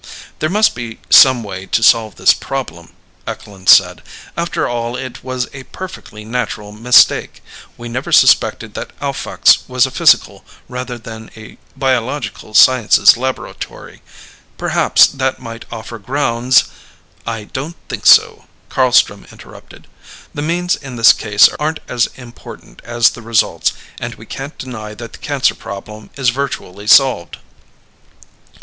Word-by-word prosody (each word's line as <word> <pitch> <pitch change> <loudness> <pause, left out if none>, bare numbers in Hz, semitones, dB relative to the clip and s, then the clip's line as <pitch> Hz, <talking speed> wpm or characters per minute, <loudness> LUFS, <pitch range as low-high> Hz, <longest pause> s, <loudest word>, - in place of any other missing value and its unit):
"There 155 - -1
must 210 +4 +2
be 120 -2 -7
some 130 -3 +7
way 95 -2 -8
to 115 - 0
solve 110 -3 +3
this - - +4
problem," - - -7 0.3
Eklund 95 -2 -6
said. - - +5 0.3
"After 170 +1 -2
all 120 0 -4
it 130 -2 -8
was 130 -1 -3
a 135 - -9
perfectly 110 -12 -10
natural 110 -3 -4
mistake. 115 +4 +3 0.3
We 120 - -9
never 125 +3 -5
suspected - - +3
that - - -9
Alphax - - +2
was 125 -1 +2
a 130 - -6
physical - - +2 0.2
rather 125 0 -6
than 110 -1 -11
a 110 -1 -14 0.2
biological 130 -4 -3
sciences 125 -3 +6
laboratory. 130 +2 -7 0.6
Perhaps - - +3
that 130 -1 -2
might 115 -1 -9
offer 115 0 -8
grounds 125 +1 +1 0.3
" - - -29
"I 110 - -9
don't 140 +10 -7
think - - -4
so," - - +5 0.3
Carlstrom 125 -6 +2
interrupted. - - -15 0.5
"The 145 - -5
means 175 +3 -1
in 135 -3 -10
this 115 -1 +6
case 105 -1 +4
aren't 155 +1 -2
as 120 -1 0
important 120 -2 -13
as 120 -1 +2
the 120 - -11
results, 115 -1 0 0.3
and - - -6
we - - -14
can't 135 +3 -8
deny 110 -5 -8
that 115 +1 -10
the - - -12
cancer 140 -3 0
problem 105 +2 -10
is 135 -3 +1
virtually 120 -6 -5
solved." 125 -9 +3
120 Hz, 140 wpm, -16 LUFS, 110-130 Hz, 0.6 s, some